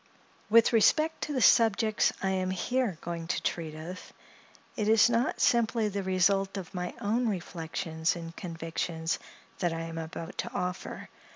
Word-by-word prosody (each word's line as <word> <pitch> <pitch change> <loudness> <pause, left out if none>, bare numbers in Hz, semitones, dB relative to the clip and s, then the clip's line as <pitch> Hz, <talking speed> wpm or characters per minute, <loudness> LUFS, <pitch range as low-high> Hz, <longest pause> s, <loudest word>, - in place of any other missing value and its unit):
With 230 +2 +6
respect 310 +8 +3
to 300 - -4
the 255 -4 +1
subjects 220 -1 +4
I 190 - +1
am 185 -1 0
here 205 +1 -1
going 170 -1 -5
to - - -2
treat 160 -2 -2
of, 170 +4 -7 0.7
it 210 -4 -1
is 220 +1 +6
not 235 +2 +1
simply 230 -2 +2
the 200 0 -3
result 195 +1 +1
of 185 -4 -7
my 180 -1 -4
own 230 +3 +1
reflections 165 -3 -2
and 165 -1 -8
convictions 165 -1 -3 0.4
that 175 -2 0
I 165 - -3
am 165 0 -5
about 165 +1 -7
to 235 - -2
offer. 180 -5 -4
185 Hz, 160 wpm, -29 LUFS, 165-220 Hz, 0.7 s, With